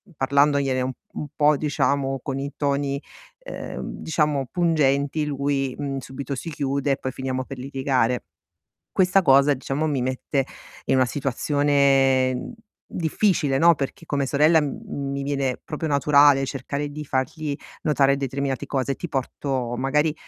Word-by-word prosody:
parlandogliene 140 -1 +2
u 130 +1 -1 0.2
un 150 - -5
po', 150 0 +4
diciamo 140 -2 0
con 135 -1 -4
i 140 +1 -4
toni, 140 -1 -1 0.4
ehm, - - -7 0.2
diciamo, 150 -4 0
pungenti, 150 -4 +1
lui, 140 -2 -1
mhmm, 140 -2 -3
subito 135 +1 -5
si 165 - -6
chiude 140 -1 -1
e 135 - +1
poi 130 - -4
finiamo 130 0 -3
per 135 - -8
litigare. 130 -2 0 0.7
Questa 185 +1 +4
cosa, 140 -2 +5
diciamo, 135 +4 -2
mi 140 -4 0
mette 130 +2 -1 0.4
in - - +2
una 130 -1 +4
situazione 135 - +2 0.4
difficile, 165 -4 +1
no, 170 +3 +6
perché 140 +4 -5
come 140 -3 -1
sorella 150 +4 +4
m 140 -1 -4
mi 140 0 -3
viene 140 -2 -1
proprio 155 +1 -4
naturale 140 -1 +5
cercare 140 +2 -4
di 150 +1 -7
fargli 140 +3 -2 0.3
notare 140 -2 +3
determinate 140 0 -2
cose. 135 -1 -1
Ti 175 - -6
porto 130 -3 -2
magari 150 +4 +1
140 Hz, 140 wpm, -24 LUFS, 135-145 Hz, 0.7 s, no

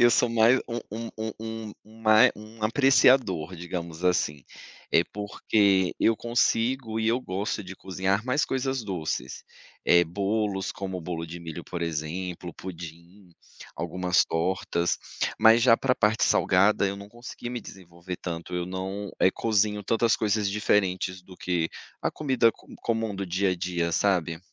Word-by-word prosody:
eu 120 0 +7
sou 120 +1 +3
mais 115 +2 +4
um 120 0 -3
um 115 +1 -5 0.3
um 110 -1 -6
um 110 +1 -17
ma 110 0 +6
um 110 +1 -13
apreciador, 120 - +4
digamos 85 0 -6
assim, 75 -6 +1 0.5
é 85 - +6
porque 100 -2 +1
eu 115 - +4
consigo 120 0 0
e 110 - +1
eu 120 +3 +2
gosto 100 0 -3
de 95 +1 -8
cozinhar 95 +3 -1
mais 130 +3 +1
coisas 130 -1 -2
doces, 80 -9 -4 0.4
eh, 85 0 +5
bolos 100 +2 -1
como 95 -1 -5
o - - -7
bolo 85 -1 -4
de 85 +1 -8
milho, 85 0 -7
por 85 -1 -5
exemplo, 85 +2 -4
pudim, 85 +1 -10 0.5
algumas 90 +2 +1
tortas, 85 0 -1 0.4
mas 110 +1 +6
já 115 -2 +6
pra 130 0 +1
parte 110 -1 +2
salgada, 100 +2 +3
eu 100 0 -3
não 100 0 -10
consegui 120 +1 -8
me 125 -1 -4
desenvolver 90 -2 -9
tanto, 85 0 -6
eu 90 0 -1
não, 95 +2 -4
eh, 95 - +5
cozinho 105 -1 +1
tantas 115 +3 +2
coisas 105 -1 +1
diferentes 95 -3 0
do 90 0 -14
que 85 -3 -1 0.3
a - - 0
comida 130 -6 +2
co - - -22 0.2
comum 115 -2 -1
do 100 0 -4
dia 95 +2 +1
a - - +1
dia, 85 -1 -1
sabe. 85 -3 +1
100 Hz, 160 wpm, -26 LUFS, 90-110 Hz, 0.5 s, eu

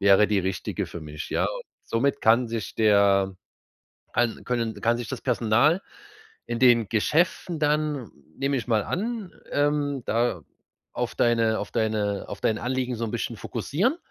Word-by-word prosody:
wäre 100 +1 +6
die 105 -1 +2
richtige 95 0 -3
für 85 - -8
mich?“ 75 0 -7
Ja? - - +1 0.4
Somit 135 +5 0
kann 115 +3 +4
sich 115 -3 -4
der 100 -3 +4 0.8
kann 120 -2 0
können 115 -3 -2
kann 120 +1 +2
sich 120 - -5
das - - -5
Personal 125 - +3 0.7
in 120 - -3
den 120 -4 +5
Geschäften 165 - +1
dann, 150 -4 0 0.3
nehme 140 +1 0
ich 120 - -3
mal 110 -3 +3
an, 220 0 -3 0.2
ähm, 145 -2 +1
da 115 -7 0 0.5
auf - - -2
deine 115 -2 +2
auf 105 - -5
deine 105 -2 0
auf - - -7
dein 110 - +1
Anliegen 125 0 -2
so 115 - -2
'n 110 - -5
bisschen - - -3
fokussieren 215 - -1
115 Hz, 155 wpm, -25 LUFS, 110-140 Hz, 0.8 s, wäre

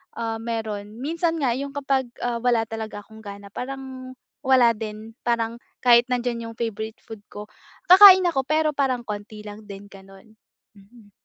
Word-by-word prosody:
ah, 225 -1 -3
meron 220 -1 -5
minsan 330 +4 -1
nga 265 -5 +1
yung 280 +1 -5
kapag, 270 -2 0 0.2
ah, 240 -1 -1
wala 240 -2 +2
talaga 220 -2 -6
akong 220 +1 -15
gana 200 0 -9
parang 260 +1 -7 0.3
wala 255 -3 +5
din, 220 +1 -8
parang 230 -1 0 0.3
kahit 240 -1 +6
nandiyan 245 -2 -2
'yong - - -24
favorite 220 -1 -5
food 225 - -9 0.2
ko, 210 +1 -9 0.4
kakain 380 0 +10
ako 270 -5 -1
pero 310 0 +2
parang 260 -3 0
konti 210 -1 -7
lang 210 +1 -10
din, 200 0 -10
gano'n, 195 +3 -16 0.4
mm. 205 +1 -19
230 Hz, 160 wpm, -23 LUFS, 215-260 Hz, 0.4 s, kakain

